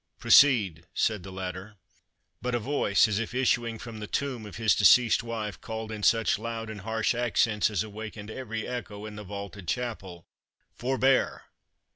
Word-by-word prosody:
"Proceed," 100 - +5
said 110 -4 +1
the 95 +2 -9
latter. 95 +2 -6 0.7
But 125 +2 -1
a - - +1
voice, 115 -5 +2
as 105 -1 -1
if 115 +1 -4
issuing 120 -3 +1
from 115 -1 -9
the 105 - -6
tomb 125 -5 -3
of 105 - -10
his 110 -2 +3
deceased 115 +2 +5
wife, 110 -5 -5
called, 110 -1 -5
in 110 -1 -6
such 110 -1 +3
loud 115 -1 -5
and 105 -2 -8
harsh 110 +3 0
accents 115 -3 +1
as 105 -3 -1
awakened 110 0 -8
every 110 -3 -5
echo 110 -4 -6
in 105 -1 -8
the 105 - -7
vaulted 100 -1 -8
chapel, 95 -7 -4 0.5
"Forbear!" 130 +1 +1
110 Hz, 165 wpm, -28 LUFS, 105-120 Hz, 0.7 s, Proceed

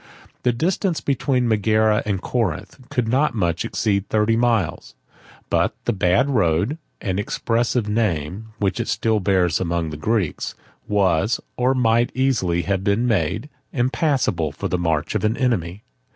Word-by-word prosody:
The 125 - +2
distance 170 - 0
between 130 -2 0
Megara 110 0 +3
and 100 -3 0
Corinth 120 - -3
could 125 -2 -1
not 130 +2 +2
much 85 -5 0
exceed 100 -2 -1
thirty 110 +1 +2
miles; 115 -8 0 0.5
but - - +1
the - - +1
bad 95 +5 +2
road, 105 - +1 0.2
an 95 -1 -1
expressive 115 +2 0
name, 105 -2 -1
which 100 -3 -1
it - - -2
still 110 -1 +1
bears 95 -4 +2
among 85 -3 -1
the 75 - -6
Greeks, 100 0 -1 0.3
was, 100 0 +2 0.2
or 125 +2 +2
might 120 -1 +2
easily 110 -11 +1
have 95 +3 -1
been 100 +5 +1
made, 105 - 0 0.3
impassable 125 - +1
for 70 - -4
the 90 - -1
march 80 -2 0
of 105 - -1
an 110 +2 +1
enemy. 105 - -1
105 Hz, 150 wpm, -22 LUFS, 90-120 Hz, 0.5 s, Megara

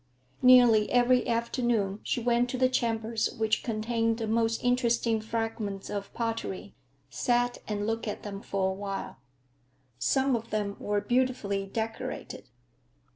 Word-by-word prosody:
Nearly 245 -4 +6
every 245 0 +4
afternoon 230 -3 0
she - - -1
went 240 +1 +2
to 255 - -3
the 255 0 +3
chambers 225 -2 0
which 220 -1 +1
contained 225 0 0
the 230 - -2
most 225 +1 0
interesting 235 -2 +2
fragments 220 -3 -3
of 200 -1 -4
pottery, 225 -4 -4 0.4
sat 245 0 +1
and 205 -1 -2
looked 225 +1 -2
at 210 - -4
them 200 -1 -6
for 190 -2 -1
a - - -3
while. 195 0 -5 0.8
Some 270 -1 +2
of 230 0 -5
them 205 -1 -2
were 205 0 -1
beautifully 210 -4 0
decorated. 225 - -5
225 Hz, 135 wpm, -28 LUFS, 210-240 Hz, 0.8 s, Nearly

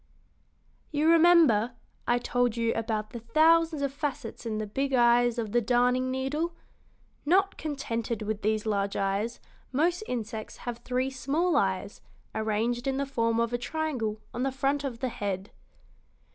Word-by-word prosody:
"You 300 +1 +1
remember, 320 -10 +5 0.3
I 240 - +3
told 245 -1 0
you 230 0 +1
about 220 -1 -2
the 240 - -6
thousands 315 +5 +3
of 275 -1 -1
facets 280 -5 -4
in 215 -1 -2
the 215 - -2
big 270 +6 -2
eyes 240 -1 +4
of 220 -3 -2
the 240 - +3
darning 250 +2 +2
needle? 290 +6 -2 0.7
Not 385 +6 +3
contented 235 -7 -3
with 215 0 -3
these 215 0 0
large 200 -2 0
eyes, 200 +4 -1 0.3
most 335 +7 +1
insects 225 -2 -5
have 240 -1 -4
three 255 +2 -1
small 300 +6 0
eyes 190 -5 0 0.3
arranged 225 +3 -1
in 270 0 0
the 280 - 0
form 230 -4 0
of 235 +1 0
a 240 - 0
triangle 250 -7 -2
on 240 - -3
the 270 +1 +1
front 275 +2 0
of 245 -4 -5
the 260 - 0
head." 200 -3 -4
245 Hz, 160 wpm, -28 LUFS, 225-280 Hz, 0.7 s, remember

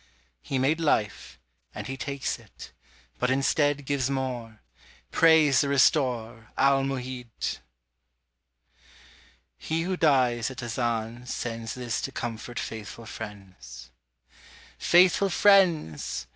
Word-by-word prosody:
He 135 - -3
made 140 +5 +1
life 105 - -1 0.4
and - - -6
He 135 - -5
takes 140 -1 -3
it 110 -4 -13 0.5
but 125 - +1
instead 145 +1 +1
Gives 135 -2 0
more: 125 -5 -4 0.5
praise 160 -4 +5
the 140 - -1
Restorer, 125 -5 +1
Al 135 0 +4
Mu'hid! 130 -3 -4 2.0
He 165 +1 -2
who 185 +2 -1
dies 130 -8 +2
at 130 -2 -8
Azan 120 0 -3
sends 115 -2 -4
This 120 -2 -3
to 135 - -4
comfort 120 -1 -6
faithful 110 0 -6
friends: 90 - -10 0.9
Faithful 180 +3 +4
friends! 175 - +3
130 Hz, 105 wpm, -27 LUFS, 115-140 Hz, 2.0 s, praise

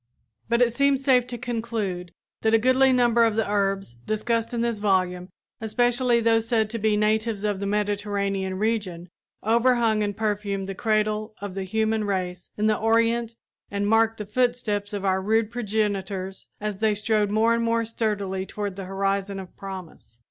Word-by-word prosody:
But 235 +1 +4
it 235 -2 +1
seems 275 +1 +2
safe 250 -3 +4
to 245 - -5
conclude 225 -7 -3 0.3
that 220 0 +3
a - - +7
goodly 255 +3 +4
number 240 -2 +4
of 225 -2 +2
the 225 - 0
herbs 195 -7 0
discussed 230 +2 0
in 235 -1 -1
this 235 -2 -1
volume, 185 -3 0 0.3
especially 245 +2 +2
those 225 0 +2
said 220 -3 +1
to 230 - -3
be 215 0 +2
natives 215 0 +1
of 205 -2 0
the 200 - -2
Mediterranean 200 -2 -1
region, 195 -5 -2 0.3
overhung 230 -1 +3
and 205 -1 -2
perfumed 205 -3 -2
the 195 - -4
cradle 215 0 0
of 200 -1 -6
the 195 0 -4
human 220 +2 0
race 180 -3 -3
in 210 - 0
the 215 -1 +2
Orient 230 +1 +2 0.3
and 200 0 -1
marked 225 +1 +3
the 210 - -5
footsteps 220 -2 0
of 200 -1 -4
our 190 0 +2
rude 220 +2 +1
progenitors 200 -4 -2
as 210 -2 -4
they 215 -1 +2
strode 210 0 +1
more 220 +2 +3
and 230 0 0
more 230 0 +1
sturdily 205 -4 -2
toward 200 0 -5
the 195 - -5
horizon 195 +1 -1
of 185 -2 -10
promise. 185 - -9
215 Hz, 175 wpm, -25 LUFS, 195-230 Hz, 0.3 s, a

